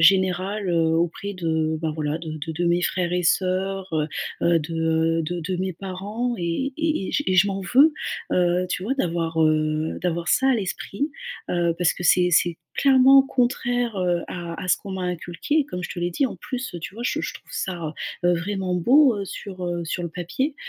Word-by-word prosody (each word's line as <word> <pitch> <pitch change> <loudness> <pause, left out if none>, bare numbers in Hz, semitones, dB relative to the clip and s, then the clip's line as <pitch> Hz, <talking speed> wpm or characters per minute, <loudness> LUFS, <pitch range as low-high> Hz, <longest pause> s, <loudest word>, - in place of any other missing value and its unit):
général, 190 +3 +3
heu, 165 -1 +3
auprès 175 +4 -1
de 160 -3 0
bah 160 - 0
voilà, 150 -1 -1
de 160 -2 -6
de 160 - -3
de 170 +2 -2
mes 170 +1 +3
frères 175 -1 0
et 180 0 +1
sœurs, 190 +2 0
heu 155 -1 0 0.3
heu, 170 -1 +4
de, 165 +1 -5 0.5
heu, - - -1
de 175 +2 -3
de 180 +3 -2
mes 185 0 -2
parents 200 +7 -3
et 175 +11 -1
et 315 -11 0
et - - -5
j 290 - +1
et 185 - +2
je 190 +2 +6
m'en 195 -1 -2
veux, 265 +11 +5 0.4
heu, 180 0 +2
tu 180 - -2
vois? 255 +6 0
D'avoir, 165 -8 -1
heu, 155 0 +1
d'avoir 170 -1 -1
ça 265 +7 +3
à - - +4
l'esprit, 220 - -3 0.4
heu, 170 -1 +1
parce 175 -2 +3
que - - -7
c'est 180 0 +4
c'est 170 0 +3 0.2
clairement 270 0 +6
contraire, 245 -3 0
heu, 175 -2 +1
à 175 -1 -5 0.2
à 180 - -5
ce - - +5
qu'on 195 - -8
m'a 190 -1 -4
inculqué, 180 - -1
comme 180 -7 -5
je - - -5
te - - -6
l'ai 175 0 -1
dit. 275 - +1
En - - -7
plus, 255 -2 -5
heu, - - -4
tu 175 - -7
vois? 235 - -6
Je - - 0
je - - -4
trouve - - -13
ça, 170 -5 -3 0.3
heu, 175 - +5
vraiment 185 +1 -2
beau, 255 - +5
heu, 200 - -3
sur, 185 -1 -7
heu, 175 -1 -2
sur 175 +2 -3
le - - -3
papier, 180 - -2
180 Hz, 220 wpm, -24 LUFS, 170-205 Hz, 0.5 s, je